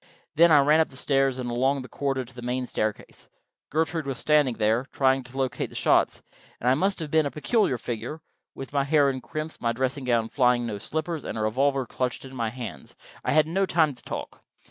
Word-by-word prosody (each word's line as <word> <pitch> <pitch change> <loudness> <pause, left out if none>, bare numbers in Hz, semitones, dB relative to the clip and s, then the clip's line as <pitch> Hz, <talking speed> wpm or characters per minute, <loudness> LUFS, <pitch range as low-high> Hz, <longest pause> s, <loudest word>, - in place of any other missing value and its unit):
Then 165 +2 +6
I 150 - +8
ran 150 +3 +4
up 160 - +2
the 130 - -10
stairs 135 -1 +1
and 125 -1 -4
along 130 +3 +1
the - - -9
corridor 135 -2 -2
to 120 - -16
the 125 - -9
main 125 +1 -2
staircase. 110 -3 -4 0.4
Gertrude 160 0 -1
was 135 -3 -3
standing 150 -4 +3
there, 110 +4 +1
trying 135 -1 +2
to 125 +2 -12
locate 130 -1 -1
the - - -14
shots, - - +2 0.4
and 125 - -3
I 125 - +6
must 190 +8 +1
have 155 -2 -5
been 155 -2 +3
a - - -2
peculiar 155 - +1
figure, 120 +6 -5 0.4
with 135 +1 -8
my 140 -1 +2
hair 145 -1 +3
in 130 -1 -6
crimps, 155 +6 -6
my 115 -1 +1
dressing 130 +2 -2
gown 115 -2 +1
flying, 125 -2 +2
no 105 -3 -4
slippers, 160 - -3
and - - -5
a - - -2
revolver 135 +5 +1
clutched 125 +2 -3
in 135 - -11
my 115 -3 -1
hands 120 - -8 0.3
I - - 0
had 155 0 +5
no 190 +5 0
time 160 -5 +3
to 125 - -16
talk. - - -7
135 Hz, 225 wpm, -26 LUFS, 125-150 Hz, 0.4 s, I